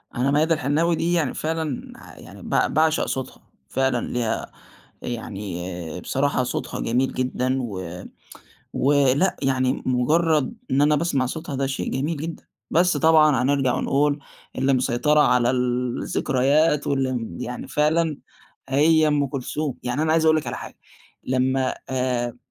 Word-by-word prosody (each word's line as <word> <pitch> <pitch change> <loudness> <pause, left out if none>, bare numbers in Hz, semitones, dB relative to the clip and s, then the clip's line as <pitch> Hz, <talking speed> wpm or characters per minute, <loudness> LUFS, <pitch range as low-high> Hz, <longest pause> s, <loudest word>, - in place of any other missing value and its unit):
أنا 130 +3 +1
ميادة 155 +3 +3
الحناوي 155 +4 +1
دي 170 +2 0
يعني 160 -6 +1
فعلًا 160 -3 -3 0.3
يعني - - -13
ب - - 0
باعشق 160 +1 +2
صوتها، 130 -1 -5 0.3
فعلًا 130 -2 0
ليها 120 -2 -2 0.5
يعني، 100 -6 -5 0.3
آآ، - - -5
بصراحة 135 +7 0
صوتها 125 - -4
جميل 125 +3 0
جدًا 130 0 -1
و 95 -6 -6 0.7
ولأ 145 +6 +3
يعني 130 -1 +1
مجرد 150 - +2 0.2
إن 135 - +3
أنا 150 +1 +4
باسمع 145 -4 0
صوتها 150 +2 -5
ده 135 0 0
شيء 135 - -3
جميل 145 +5 -1
جدًا، 160 +3 -6 0.3
بس 175 -1 +3
طبعًا 155 -2 +5
هنرجع 135 -2 +2
ونقول 145 +1 +1 0.4
اللي 135 +1 +2
مسيطرة 130 +4 +2
على 125 -4 +4
الذكريات 130 +4 +1
واللي، 135 -2 +1
امم، 115 -9 -4
يعني 125 0 -5
فعلًا 155 0 +1 0.5
هي 155 +3 +4
أم 145 -1 +2
كلثوم. 140 +1 -3
يعني 125 +4 -1
أنا 155 0 +1
عايز 160 0 +3
أقول 155 0 +5
لِك 155 - -3
على - - -3
حاجة، - - -9 0.5
لمّا، 130 0 0
آآ، 125 -2 -1
135 Hz, 145 wpm, -23 LUFS, 125-155 Hz, 0.7 s, طبعًا